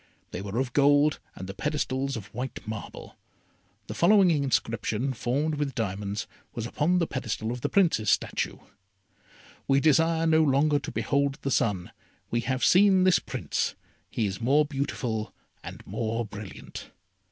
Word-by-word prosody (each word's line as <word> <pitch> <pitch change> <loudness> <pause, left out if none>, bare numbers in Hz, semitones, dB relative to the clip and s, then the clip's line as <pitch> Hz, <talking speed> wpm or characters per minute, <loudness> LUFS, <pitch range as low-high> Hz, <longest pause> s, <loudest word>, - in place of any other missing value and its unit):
They - - -5
were 100 +2 -5
of 125 -1 -1
gold, 145 +1 +4 0.2
and 95 - -7
the 95 - -6
pedestals 135 0 -2
of 100 0 -10
white 125 -1 -6
marble. 110 -1 -7 0.7
The - - -6
following 190 0 +5
inscription, 130 -3 0
formed 140 +7 -1
with 140 -4 -2
diamonds, 100 0 -3 0.3
was 115 - -3
upon 155 +8 +1
the 170 - +2
pedestal 115 -5 -3
of 120 0 -5
the - - -1
Prince's 165 - +2
statue: - - 0 1.1
"We 135 0 +4
desire 160 +2 +3
no 160 -1 +4
longer 145 0 +3
to - - -7
behold 140 -1 0
the 140 - -1
sun, 100 -7 0 0.4
We 120 - +1
have 130 +2 0
seen 190 0 +5
this 185 -1 +5
Prince; - - -3 0.3
He 110 - -1
is 100 +1 -4
more 140 +6 +4
beautiful 135 -6 -3 0.3
and - - -9
more 115 +1 -2
brilliant." 105 -1 -9
135 Hz, 155 wpm, -27 LUFS, 115-150 Hz, 1.1 s, following